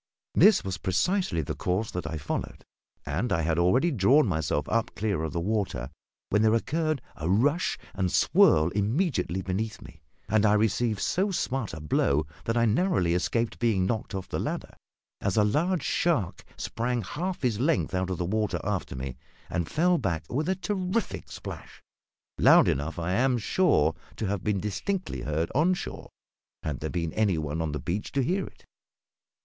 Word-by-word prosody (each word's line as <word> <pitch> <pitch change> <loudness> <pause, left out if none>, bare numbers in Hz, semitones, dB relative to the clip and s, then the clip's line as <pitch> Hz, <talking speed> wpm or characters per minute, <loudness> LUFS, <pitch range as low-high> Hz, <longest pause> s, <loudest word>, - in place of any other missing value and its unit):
This 210 -2 +6
was 95 -2 -4
precisely 95 - 0
the - - -3
course 95 +5 -1
that 90 -3 -4
I 80 +1 -4
followed; 70 - -4 0.4
and 80 +13 -2
I 85 - +1
had 80 +1 +1
already 125 - +3
drawn 130 +5 +4
myself 80 - -1
up 115 0 0
clear 100 -6 -1
of 80 -1 -2
the 85 - -2
water 90 - -2 0.4
when 105 - +3
there 110 +1 +4
occurred 155 +2 -1
a 80 +2 -3
rush 140 - +2 0.2
and 95 -2 -1
swirl 80 +2 +4
immediately 105 - 0
beneath 105 +4 -3
me, 75 - -14 0.3
and 110 -1 +2
I 105 -1 +5
received 105 0 +1
so 190 - +1
smart 135 - -2
a - - -7
blow 75 -1 +1 0.2
that 115 +1 0
I 115 - +4
narrowly 115 - +2
escaped 115 +6 -1
being 110 -6 +2
knocked 110 0 -2
off 95 - -4
the - - -3
ladder, - - -4 0.5
as 100 0 0
a 105 - +5
large 155 - +1
shark 135 - 0
sprang 120 0 -2
half 175 - -4
his 115 -4 +1
length 145 -4 +1
out 95 0 0
of 90 - -2
the 90 - -2
water 105 +3 0
after - - -2
me 65 -1 -5 0.3
and 85 -2 -1
fell 175 +2 +2
back 85 -5 -1
with 155 +7 0
a 190 - +2
terrific 190 +2 -2
splash, - - -9 0.6
loud - - +7
enough, 75 +6 -1
I 85 +2 -1
am 125 +4 +2
sure, 110 - +2 0.2
to 110 - -3
have 100 -1 -2
been 105 -2 0
distinctly 175 - -3
heard 80 +3 -1
on 170 +7 +3
shore, - - -7 0.5
had 75 -4 -3
there - - -3
been 85 -2 -2
any 105 -6 +2
one 75 +1 -2
on 80 -2 -1
the 75 - -3
beach 90 +10 -3
to 135 - +2
hear 185 +9 0
it. - - -17
105 Hz, 180 wpm, -27 LUFS, 85-135 Hz, 0.6 s, loud